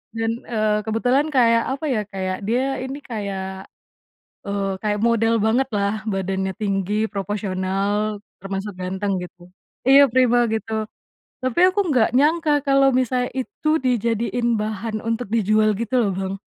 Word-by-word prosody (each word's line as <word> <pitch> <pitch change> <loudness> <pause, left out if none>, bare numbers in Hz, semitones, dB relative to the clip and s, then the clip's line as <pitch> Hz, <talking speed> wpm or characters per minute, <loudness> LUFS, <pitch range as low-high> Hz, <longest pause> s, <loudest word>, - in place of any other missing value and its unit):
Dan, 225 0 0 0.2
eee, 215 -2 +1
kebetulan 250 +6 +2
kayak, 235 -5 +3
apa 280 +3 -3
ya, 220 -4 +1
kayak 185 -2 -3
dia 260 +4 0
ini 265 +3 -5
kayak 190 -4 -5 0.8
eee, 200 -1 -2
kayak 210 -1 -1
model 230 0 +2
banget 235 +5 +2
lah 205 +1 -1
badannya, 190 -2 -2
tinggi, 205 +2 0
proporsional, 200 +1 -2 0.2
termasuk 195 0 -4
ganteng 190 +2 -2
gitu, 175 0 -14 0.4
iya 275 +1 +8
prima, 245 -1 +4
gitu, 220 0 -2 0.6
tapi 255 +5 -1
aku 375 +2 +3
enggak 250 -6 +3
nyangka 295 +2 +3
kalau 275 -1 +4
misalnya 250 0 0
itu 285 +4 -5
dijadiin 235 -1 0
bahan 215 +1 -3
untuk 230 -1 -3
dijual 215 -1 +3
gitu 235 +2 -3
loh, 230 -5 +2
Bang. 190 +1 -3
220 Hz, 140 wpm, -22 LUFS, 200-250 Hz, 0.8 s, iya